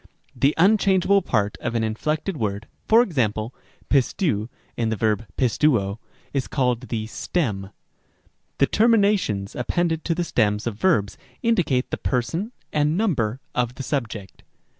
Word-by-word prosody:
Rem. -, -, -24 dB, 0.3 s
b. 135 Hz, -, +2 dB
The 145 Hz, -, +1 dB
unchangeable 195 Hz, +1 st, +4 dB
part 105 Hz, -, 0 dB
of 120 Hz, 0 st, -2 dB
an 115 Hz, -, +1 dB
inflected 150 Hz, -, -2 dB
word 105 Hz, -4 st, -3 dB, 0.2 s
(for 230 Hz, +2 st, +6 dB
example, 115 Hz, -, -1 dB, 0.4 s
πιστεὺ 130 Hz, -, +1 dB, 0.3 s
in 115 Hz, -2 st, 0 dB
the 110 Hz, -, 0 dB
verb 110 Hz, +1 st, 0 dB
πιστεύω) 115 Hz, -5 st, +2 dB, 0.3 s
is 135 Hz, -2 st, -1 dB
called 125 Hz, -2 st, 0 dB
the 110 Hz, -2 st, -2 dB
stem. 110 Hz, -, -2 dB
Rem. -, -, -13 dB
c. -, -, -43 dB, 0.8 s
The 140 Hz, -, +5 dB
terminations 200 Hz, -, +2 dB
appended 160 Hz, +6 st, 0 dB
to 165 Hz, -, +1 dB
the 175 Hz, -, 0 dB
stems 105 Hz, -9 st, +1 dB
of 120 Hz, -, -1 dB
verbs 105 Hz, -, +1 dB, 0.2 s
indicate 175 Hz, -, +1 dB
the -, -, -1 dB
person 165 Hz, -, -1 dB, 0.2 s
and 150 Hz, +2 st, +2 dB
number 135 Hz, -, 0 dB
of 125 Hz, 0 st, -1 dB
the 135 Hz, -, -6 dB
subject. 115 Hz, -9 st, -4 dB
125 Hz, 155 wpm, -23 LUFS, 110-170 Hz, 0.8 s, for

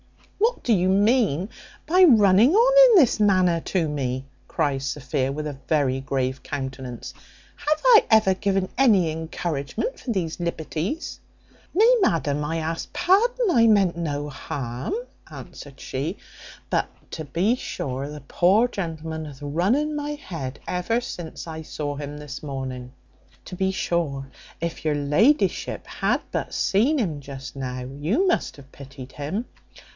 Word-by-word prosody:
"What 460 Hz, +4 st, +1 dB
do 235 Hz, -, +3 dB
you 185 Hz, -2 st, +2 dB
mean 200 Hz, -, +2 dB, 0.4 s
by 365 Hz, +4 st, +5 dB
running 220 Hz, -, +6 dB
on -, -, +7 dB
in 415 Hz, -, +8 dB
this 245 Hz, -5 st, +2 dB
manner 185 Hz, -5 st, +3 dB
to 170 Hz, -2 st, -1 dB
me?" 130 Hz, -3 st, -3 dB, 0.2 s
cries 140 Hz, -4 st, -1 dB
Sophia, 135 Hz, -1 st, -2 dB
with 150 Hz, +2 st, -4 dB
a 145 Hz, -2 st, -5 dB
very 140 Hz, -4 st, +1 dB
grave 130 Hz, 0 st, -2 dB
countenance. 130 Hz, -3 st, -6 dB, 0.4 s
"Have 305 Hz, +1 st, -1 dB
I -, -, +7 dB
ever 215 Hz, -4 st, +5 dB
given 195 Hz, -1 st, -1 dB
any 200 Hz, -11 st, +4 dB
encouragement 160 Hz, -, -4 dB
for 250 Hz, -, -4 dB
these 180 Hz, -5 st, -2 dB
liberties?" 170 Hz, -, -3 dB, 0.5 s
"Nay, 440 Hz, +7 st, +5 dB
ma'am, 150 Hz, -, +1 dB
I 160 Hz, +3 st, -2 dB
ask 165 Hz, +1 st, -4 dB
pardon; 415 Hz, +5 st, +2 dB
I 230 Hz, -5 st, +5 dB
meant 200 Hz, -6 st, +4 dB
no 150 Hz, -3 st, -3 dB
harm," 135 Hz, -, -5 dB, 0.4 s
answered 140 Hz, -2 st, -11 dB
she; 150 Hz, +9 st, -4 dB, 0.5 s
"but -, -, +1 dB, 0.2 s
to 160 Hz, -, -5 dB
be 180 Hz, -, +1 dB
sure 135 Hz, -, -4 dB
the 150 Hz, 0 st, -8 dB
poor 190 Hz, -, +3 dB
gentleman 160 Hz, -6 st, -5 dB
hath 145 Hz, -2 st, -11 dB
run 170 Hz, -, +1 dB
in 300 Hz, +1 st, -1 dB
my 295 Hz, 0 st, -3 dB
head 165 Hz, -, -6 dB
ever 180 Hz, +6 st, 0 dB
since 175 Hz, -10 st, -7 dB
I 160 Hz, -1 st, -6 dB
saw 145 Hz, -2 st, -4 dB
him 145 Hz, 0 st, -6 dB
this 145 Hz, -2 st, -8 dB
morning. 130 Hz, -3 st, -6 dB, 0.5 s
To 180 Hz, -, -7 dB
be 190 Hz, +1 st, 0 dB
sure, 150 Hz, -8 st, -2 dB, 0.3 s
if 170 Hz, 0 st, -4 dB
your 150 Hz, -1 st, +2 dB
la'ship 150 Hz, -, +1 dB
had -, -, -1 dB
but -, -, -3 dB
seen 245 Hz, +11 st, +2 dB
him 170 Hz, -, -1 dB
just 135 Hz, -2 st, -9 dB
now, 130 Hz, -2 st, -4 dB, 0.2 s
you 210 Hz, -, +1 dB
must 355 Hz, -, 0 dB
have 135 Hz, -1 st, -15 dB
pitied 135 Hz, -1 st, -11 dB
him. 165 Hz, -, -3 dB
165 Hz, 150 wpm, -24 LUFS, 140-220 Hz, 0.5 s, in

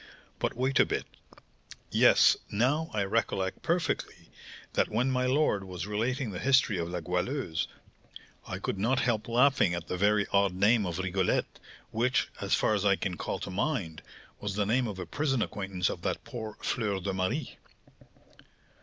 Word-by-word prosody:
But -, -, -1 dB
wait 130 Hz, +2 st, +1 dB
a -, -, +7 dB
bit. -, -, -2 dB, 0.9 s
Yes, -, -, +6 dB
now 135 Hz, +10 st, +1 dB
I 105 Hz, -2 st, 0 dB
recollect 95 Hz, -2 st, -1 dB
perfectly, 170 Hz, +1 st, -2 dB, 0.4 s
that -, -, +2 dB
when 125 Hz, +5 st, +1 dB
my 125 Hz, 0 st, +1 dB
lord 130 Hz, -7 st, +2 dB
was 90 Hz, -2 st, -6 dB
relating 115 Hz, +4 st, -1 dB
the 90 Hz, -, -5 dB
history 130 Hz, -8 st, +3 dB
of 85 Hz, 0 st, -2 dB
La 90 Hz, 0 st, -3 dB
Goualeuse, 90 Hz, -, -2 dB, 0.8 s
I -, -, -4 dB
could 95 Hz, -, -3 dB
not 125 Hz, +6 st, +2 dB
help 110 Hz, -3 st, 0 dB
laughing 120 Hz, -6 st, +3 dB
at 85 Hz, -2 st, -5 dB
the 90 Hz, -, -3 dB
very 100 Hz, +1 st, +3 dB
odd 100 Hz, -2 st, +3 dB
name 105 Hz, +2 st, +3 dB
of 85 Hz, -1 st, -3 dB
Rigolette, 95 Hz, 0 st, -1 dB, 0.3 s
which, 120 Hz, +3 st, +1 dB
as -, -, +2 dB
far -, -, +2 dB
as 100 Hz, -2 st, 0 dB
I 100 Hz, -1 st, +4 dB
can 90 Hz, -2 st, -3 dB
call -, -, -3 dB
to -, -, -5 dB
mind, 95 Hz, -, -2 dB, 0.4 s
was 105 Hz, -1 st, -4 dB
the 105 Hz, -1 st, +1 dB
name 120 Hz, +4 st, +1 dB
of 100 Hz, -3 st, -5 dB
a 90 Hz, -, -5 dB
prison 135 Hz, -, 0 dB
acquaintance 95 Hz, -3 st, -2 dB
of -, -, -4 dB
that -, -, -2 dB
poor 110 Hz, -3 st, -7 dB
Fleur 105 Hz, -5 st, -1 dB
de 95 Hz, +1 st, -3 dB
Marie." 95 Hz, +11 st, -2 dB
105 Hz, 170 wpm, -29 LUFS, 95-125 Hz, 0.9 s, a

